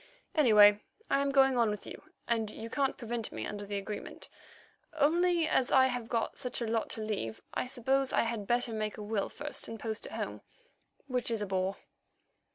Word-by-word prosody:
Anyway, 210 Hz, -8 st, +7 dB, 0.3 s
I 275 Hz, -, +4 dB
am 280 Hz, -, +1 dB
going 270 Hz, -1 st, +5 dB
on 230 Hz, -2 st, +4 dB
with 210 Hz, -1 st, -4 dB
you, -, -, -8 dB, 0.3 s
and 225 Hz, -2 st, 0 dB
you 225 Hz, +2 st, -8 dB
can't 275 Hz, -2 st, 0 dB
prevent 235 Hz, -2 st, -4 dB
me -, -, -4 dB
under 205 Hz, -1 st, -5 dB
the 205 Hz, 0 st, -2 dB
agreement. 205 Hz, +1 st, -6 dB, 0.6 s
Only 335 Hz, +2 st, +3 dB
as 265 Hz, -5 st, +2 dB
I 260 Hz, -1 st, +7 dB
have 245 Hz, -3 st, -2 dB
got 230 Hz, -1 st, -1 dB
such 250 Hz, -3 st, -3 dB
a 235 Hz, -, -1 dB
lot 225 Hz, 0 st, -1 dB
to -, -, -4 dB
leave, 195 Hz, -, -3 dB
I -, -, -1 dB
suppose 265 Hz, +1 st, +1 dB
I -, -, +3 dB
had 225 Hz, -3 st, -2 dB
better 240 Hz, -1 st, +1 dB
make 215 Hz, -1 st, -2 dB
a 210 Hz, -, -6 dB
will 205 Hz, -1 st, -1 dB
first 295 Hz, 0 st, -4 dB
and 225 Hz, 0 st, -7 dB
post 220 Hz, -1 st, -4 dB
it -, -, -10 dB
home, -, -, -4 dB, 0.6 s
which 255 Hz, -3 st, -1 dB
is 225 Hz, -2 st, -1 dB
a 210 Hz, -, -2 dB
bore." 190 Hz, 0 st, -1 dB
230 Hz, 200 wpm, -31 LUFS, 210-265 Hz, 0.6 s, Anyway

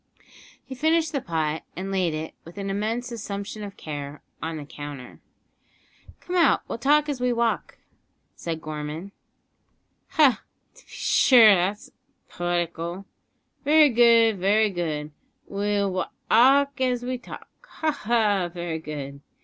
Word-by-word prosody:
He -, -, -8 dB
finished 315 Hz, +3 st, +1 dB
the 280 Hz, -, -2 dB
pot, 160 Hz, -3 st, -2 dB
and 190 Hz, +2 st, -5 dB
laid 180 Hz, -5 st, 0 dB
it, 155 Hz, +1 st, -5 dB
with 170 Hz, +3 st, -14 dB
an 195 Hz, -1 st, -3 dB
immense 225 Hz, +5 st, -2 dB
assumption 205 Hz, -2 st, -6 dB
of 200 Hz, -1 st, -8 dB
care, 145 Hz, -1 st, -7 dB, 0.2 s
on 160 Hz, 0 st, -4 dB
the 150 Hz, -, -7 dB
counter. 145 Hz, -3 st, -9 dB, 1.0 s
"Come 360 Hz, -, -5 dB
out, 345 Hz, -2 st, +4 dB
we'll -, -, -5 dB
walk 295 Hz, +2 st, +4 dB
as 280 Hz, -4 st, -3 dB
we 250 Hz, 0 st, +2 dB
talk," 235 Hz, -1 st, -1 dB, 0.6 s
said 165 Hz, -2 st, -5 dB
Gorman. 155 Hz, +4 st, -6 dB, 1.0 s
"Ha! 285 Hz, -6 st, +4 dB, 0.3 s
to -, -, -20 dB
b'shure; 235 Hz, -5 st, +5 dB
'at's 190 Hz, +4 st, -2 dB, 0.4 s
poetical 175 Hz, +1 st, -3 dB, 0.6 s
very 300 Hz, +1 st, +6 dB
good, 230 Hz, -3 st, +5 dB
very 205 Hz, +3 st, +3 dB
good, 155 Hz, -4 st, -3 dB, 0.3 s
we'll 200 Hz, 0 st, -1 dB
wa 185 Hz, 0 st, -2 dB, 0.2 s
alk 275 Hz, +4 st, +4 dB
as 245 Hz, -1 st, 0 dB
we 255 Hz, 0 st, -3 dB
talk -, -, -11 dB
ha! 315 Hz, -10 st, -2 dB
ha! 210 Hz, -8 st, +1 dB
very 170 Hz, -2 st, -4 dB
good. 140 Hz, -3 st, -7 dB
200 Hz, 135 wpm, -25 LUFS, 165-245 Hz, 1.0 s, very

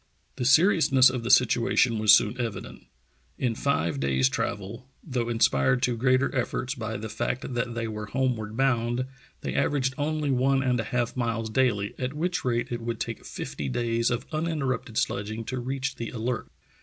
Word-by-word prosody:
The 125 Hz, -, -2 dB
seriousness 135 Hz, -3 st, +5 dB
of 125 Hz, -2 st, -3 dB
the 115 Hz, -, -4 dB
situation 120 Hz, -1 st, +3 dB
was 110 Hz, -1 st, +6 dB
soon 110 Hz, +3 st, +4 dB
evident. 110 Hz, -6 st, -6 dB, 0.5 s
In 125 Hz, -3 st, 0 dB
five 85 Hz, -, 0 dB
days' 65 Hz, -1 st, +2 dB
travel, 105 Hz, -, -4 dB
though 125 Hz, -6 st, -2 dB
inspired 115 Hz, -, +2 dB
to 125 Hz, -, +2 dB
greater 130 Hz, +3 st, +2 dB
efforts 125 Hz, 0 st, -1 dB
by 110 Hz, -4 st, -4 dB
the 110 Hz, +2 st, -5 dB
fact 120 Hz, +3 st, -3 dB
that 120 Hz, 0 st, -2 dB
they 115 Hz, -1 st, -2 dB
were 105 Hz, -1 st, -5 dB
homeward 110 Hz, -2 st, -1 dB
bound, 125 Hz, -2 st, +1 dB, 0.4 s
they -, -, -3 dB
averaged 130 Hz, -3 st, +1 dB
only 150 Hz, -1 st, 0 dB
one 135 Hz, +1 st, +2 dB
and 125 Hz, -2 st, +1 dB
a 115 Hz, -, -2 dB
half 120 Hz, +1 st, -1 dB
miles 115 Hz, -3 st, -2 dB
daily, 110 Hz, -5 st, +1 dB
at 130 Hz, +1 st, -2 dB
which 175 Hz, +4 st, -1 dB
rate 120 Hz, -1 st, -1 dB
it 120 Hz, -1 st, -3 dB
would 115 Hz, -1 st, -4 dB
take -, -, -4 dB
fifty 70 Hz, -, -5 dB
days 115 Hz, -, 0 dB
of 120 Hz, 0 st, -2 dB
uninterrupted 150 Hz, -8 st, -2 dB
sledging 110 Hz, +3 st, -2 dB
to 130 Hz, +2 st, -3 dB
reach 135 Hz, +2 st, -3 dB
the 115 Hz, -, -4 dB
Alert. 120 Hz, 0 st, -3 dB
120 Hz, 175 wpm, -26 LUFS, 110-130 Hz, 0.5 s, was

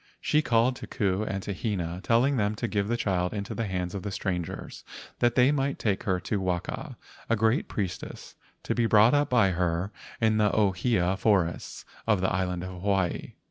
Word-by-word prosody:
She 150 Hz, -, +2 dB
called 120 Hz, -1 st, +2 dB
to -, -, -8 dB
Ku 95 Hz, -1 st, 0 dB
and 95 Hz, -2 st, -3 dB
to 100 Hz, -, -3 dB
Hina, 90 Hz, -4 st, -3 dB
telling 125 Hz, +5 st, +3 dB
them 105 Hz, -1 st, +1 dB
to 120 Hz, +2 st, -2 dB
give 100 Hz, -2 st, -1 dB
the 120 Hz, +2 st, 0 dB
child 95 Hz, -4 st, 0 dB
into 100 Hz, -1 st, -4 dB
the 115 Hz, -2 st, -2 dB
hands 90 Hz, -2 st, -3 dB
of 100 Hz, -, -4 dB
the 105 Hz, -, -4 dB
strangers, 90 Hz, -3 st, -4 dB, 0.4 s
that 120 Hz, 0 st, +2 dB
they 125 Hz, +2 st, +5 dB
might 140 Hz, -1 st, 0 dB
take 100 Hz, -1 st, -1 dB
her 95 Hz, -4 st, +1 dB
to 100 Hz, +1 st, -2 dB
Waka, 90 Hz, -2 st, -3 dB, 0.3 s
a 115 Hz, -, +4 dB
great 110 Hz, +4 st, +1 dB
priestess, 95 Hz, -3 st, -5 dB, 0.3 s
to -, -, -1 dB
be 120 Hz, -1 st, +1 dB
brought 110 Hz, +3 st, +6 dB
up 145 Hz, 0 st, +2 dB
by 115 Hz, -6 st, +4 dB
her 90 Hz, +2 st, -1 dB, 0.3 s
in 110 Hz, -1 st, +3 dB
the 105 Hz, -1 st, +4 dB
ohia 95 Hz, -1 st, +1 dB
forests 95 Hz, -5 st, 0 dB, 0.2 s
of 105 Hz, -4 st, +3 dB
the 95 Hz, 0 st, 0 dB
island 90 Hz, -1 st, -1 dB
of 95 Hz, -, -5 dB
Hawaii. 95 Hz, -3 st, 0 dB
100 Hz, 195 wpm, -27 LUFS, 90-115 Hz, 0.4 s, brought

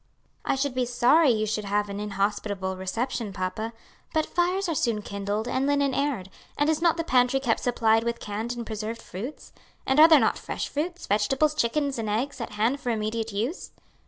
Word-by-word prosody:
"I -, -, +1 dB
should 270 Hz, 0 st, -1 dB
be 250 Hz, -1 st, 0 dB
sorry 255 Hz, +6 st, +4 dB
you 215 Hz, -3 st, +2 dB
should 215 Hz, 0 st, -2 dB
have 205 Hz, +1 st, 0 dB
an 200 Hz, 0 st, -5 dB
inhospitable 200 Hz, -1 st, -2 dB
reception, 220 Hz, +4 st, -3 dB
papa, 195 Hz, +4 st, -3 dB, 0.4 s
but 315 Hz, -, +3 dB
fires 360 Hz, +2 st, 0 dB
are 335 Hz, -, 0 dB
soon 230 Hz, -7 st, 0 dB
kindled 205 Hz, +3 st, -3 dB
and 260 Hz, +2 st, 0 dB
linen 285 Hz, -1 st, +2 dB
aired, 260 Hz, -10 st, -1 dB, 0.3 s
and 290 Hz, +2 st, +3 dB
is 315 Hz, -, -1 dB
not 335 Hz, -1 st, +3 dB
the 330 Hz, -, -1 dB
pantry 250 Hz, -2 st, +3 dB
kept 245 Hz, -4 st, +1 dB
supplied 225 Hz, -2 st, +2 dB
with 235 Hz, 0 st, -2 dB
canned 220 Hz, +3 st, -4 dB
and 235 Hz, -, -4 dB
preserved 220 Hz, +1 st, -4 dB
fruits? 235 Hz, +11 st, -8 dB, 0.3 s
and 265 Hz, +2 st, +2 dB
are 315 Hz, -, +10 dB
there 315 Hz, -3 st, +7 dB
not 220 Hz, -, +1 dB
fresh -, -, -4 dB
fruits, 345 Hz, +5 st, -3 dB
vegetables, 265 Hz, +9 st, +2 dB
chickens, 280 Hz, -1 st, 0 dB
and 220 Hz, -2 st, -2 dB
eggs 245 Hz, +6 st, -2 dB
at 230 Hz, -, -5 dB
hand 225 Hz, +7 st, +1 dB
for 250 Hz, -, -4 dB
immediate 225 Hz, 0 st, -2 dB
use?" 230 Hz, -, -3 dB
235 Hz, 195 wpm, -26 LUFS, 210-280 Hz, 0.4 s, are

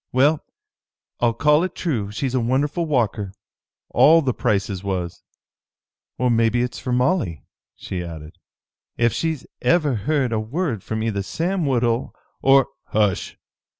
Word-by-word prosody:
Well, 145 Hz, +4 st, +3 dB, 0.8 s
I'll 115 Hz, -1 st, +2 dB
call 150 Hz, +4 st, +4 dB
it 185 Hz, -1 st, -3 dB
true, 120 Hz, -, -2 dB
she's 120 Hz, +5 st, -2 dB
a 130 Hz, -, +2 dB
wonderful 140 Hz, +8 st, 0 dB
walker. 110 Hz, -8 st, 0 dB, 0.6 s
All 165 Hz, +2 st, +6 dB
the 130 Hz, -2 st, 0 dB
Prices 100 Hz, -3 st, -1 dB
was." 90 Hz, -3 st, -3 dB, 1.0 s
"Or 125 Hz, -1 st, +2 dB
maybe 115 Hz, +1 st, +2 dB
it's 125 Hz, 0 st, -4 dB
for 125 Hz, -, -4 dB
Molly," 125 Hz, -, +1 dB, 0.3 s
she 90 Hz, -2 st, -5 dB
added. 80 Hz, -2 st, -9 dB, 0.6 s
"Ef 120 Hz, -1 st, +2 dB
she's 160 Hz, -4 st, -2 dB, 0.2 s
ever 150 Hz, +1 st, +3 dB
heard 130 Hz, +4 st, 0 dB
a 110 Hz, -, +1 dB
word 120 Hz, -, -2 dB
from 110 Hz, 0 st, -3 dB
either 105 Hz, -3 st, -1 dB
Sam 170 Hz, -, -1 dB
Woodhull 120 Hz, -2 st, 0 dB, 0.3 s
or 135 Hz, 0 st, +5 dB
" -, -, -59 dB
"Hush! 105 Hz, -4 st, 0 dB
125 Hz, 145 wpm, -22 LUFS, 105-145 Hz, 1.0 s, All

